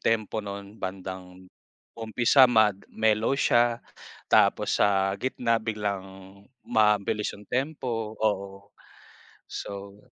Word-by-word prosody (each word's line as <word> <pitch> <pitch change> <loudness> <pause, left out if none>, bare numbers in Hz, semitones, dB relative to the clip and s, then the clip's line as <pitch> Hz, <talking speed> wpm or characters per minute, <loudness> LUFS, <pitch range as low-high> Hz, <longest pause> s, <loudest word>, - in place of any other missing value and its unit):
tempo 110 -1 0
no'n? 100 +1 -8
Bandang 95 -1 -7 0.5
umpisa 120 +4 +4
mag 110 -4 +3
mellow 110 +3 +1
siya 120 -3 +2 0.5
tapos - - +3
sa 95 -1 +3
gitna 120 -3 0
biglang 105 -3 -3 0.6
mabilis 105 -1 +1
'yung 105 - -15
tempo. 125 -5 -2
Oo. 100 -2 -2 0.8
So 100 0 -7
105 Hz, 95 wpm, -26 LUFS, 100-115 Hz, 0.8 s, umpisa